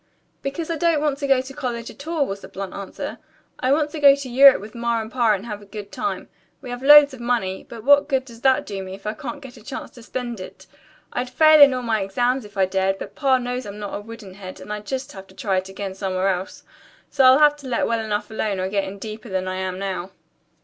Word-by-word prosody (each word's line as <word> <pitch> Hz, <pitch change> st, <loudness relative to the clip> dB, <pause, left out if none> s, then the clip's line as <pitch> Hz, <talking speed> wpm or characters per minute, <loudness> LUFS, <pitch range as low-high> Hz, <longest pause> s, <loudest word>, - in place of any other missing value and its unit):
"Because 310 Hz, +4 st, -4 dB
I 330 Hz, -, -1 dB
don't 335 Hz, -1 st, +2 dB
want 290 Hz, -2 st, -1 dB
to 285 Hz, -, -2 dB
go 270 Hz, -2 st, +4 dB
to 265 Hz, +1 st, -10 dB
college 240 Hz, -5 st, -4 dB
at 285 Hz, -, -13 dB
all," 325 Hz, -4 st, +1 dB
was 200 Hz, -4 st, -5 dB
the -, -, -10 dB
blunt 195 Hz, -1 st, -7 dB
answer. 200 Hz, -1 st, -6 dB, 0.4 s
"I 255 Hz, -, +1 dB
want 295 Hz, +1 st, +2 dB
to 315 Hz, -, -5 dB
go 280 Hz, -1 st, +8 dB
to 280 Hz, -2 st, -7 dB
Europe 270 Hz, +2 st, +7 dB
with 210 Hz, +2 st, -10 dB
Ma 235 Hz, -1 st, -1 dB
and 220 Hz, 0 st, -6 dB
Pa 235 Hz, -4 st, +3 dB
and 200 Hz, +1 st, -4 dB
have 210 Hz, -3 st, -6 dB
a -, -, -14 dB
good 205 Hz, -1 st, -8 dB
time. 310 Hz, -, -3 dB, 0.3 s
We 255 Hz, -3 st, -8 dB
have 245 Hz, 0 st, -5 dB
loads 290 Hz, 0 st, +8 dB
of 260 Hz, -, -10 dB
money, 235 Hz, -6 st, -2 dB
but 230 Hz, -2 st, -9 dB
what 285 Hz, +2 st, +5 dB
good 265 Hz, -2 st, 0 dB
does 235 Hz, -2 st, -13 dB
that 265 Hz, 0 st, +3 dB
do 200 Hz, -2 st, -5 dB
me 190 Hz, 0 st, -7 dB
if 195 Hz, -, -17 dB
I 215 Hz, -, -1 dB
can't 240 Hz, +3 st, -7 dB
get 260 Hz, -1 st, -11 dB
a 220 Hz, -, -15 dB
chance 265 Hz, -, -7 dB
to 240 Hz, -, -14 dB
spend 240 Hz, -1 st, -5 dB
it? 185 Hz, -, -10 dB, 0.5 s
I'd 245 Hz, 0 st, -2 dB
fail 310 Hz, +3 st, +6 dB
in 285 Hz, -1 st, +10 dB
all 255 Hz, -1 st, -3 dB
my 225 Hz, -3 st, 0 dB
exams 245 Hz, +5 st, 0 dB
if 205 Hz, -1 st, -14 dB
I 190 Hz, -, +4 dB
dared, 190 Hz, +1 st, 0 dB
but -, -, -8 dB
Pa 270 Hz, -3 st, +2 dB
knows 250 Hz, -1 st, -4 dB
I'm 200 Hz, 0 st, -8 dB
not 205 Hz, -2 st, -6 dB
a -, -, -3 dB
wooden 220 Hz, -3 st, -11 dB
head, 185 Hz, -1 st, -10 dB
and 210 Hz, -, -6 dB
I'd 210 Hz, 0 st, -7 dB
just 265 Hz, +1 st, -4 dB
have 190 Hz, -1 st, -11 dB
to 190 Hz, -, -19 dB
try 195 Hz, -2 st, -1 dB
it 185 Hz, +1 st, -3 dB
again 195 Hz, 0 st, -5 dB
somewhere 190 Hz, 0 st, -1 dB
else. 185 Hz, 0 st, -4 dB, 0.5 s
So 270 Hz, -, +2 dB
I'll 260 Hz, 0 st, +8 dB
have 295 Hz, 0 st, +5 dB
to 280 Hz, -2 st, -10 dB
let 245 Hz, -, 0 dB
well 230 Hz, -1 st, -1 dB
enough 210 Hz, 0 st, -3 dB
alone 215 Hz, -3 st, -2 dB
or 185 Hz, 0 st, -1 dB
get 200 Hz, 0 st, 0 dB
in 195 Hz, +1 st, -7 dB
deeper 215 Hz, +2 st, -8 dB
than 185 Hz, -1 st, -2 dB
I 185 Hz, 0 st, -3 dB
am 185 Hz, -1 st, -3 dB
now." 190 Hz, -1 st, -4 dB
230 Hz, 270 wpm, -22 LUFS, 195-265 Hz, 0.5 s, in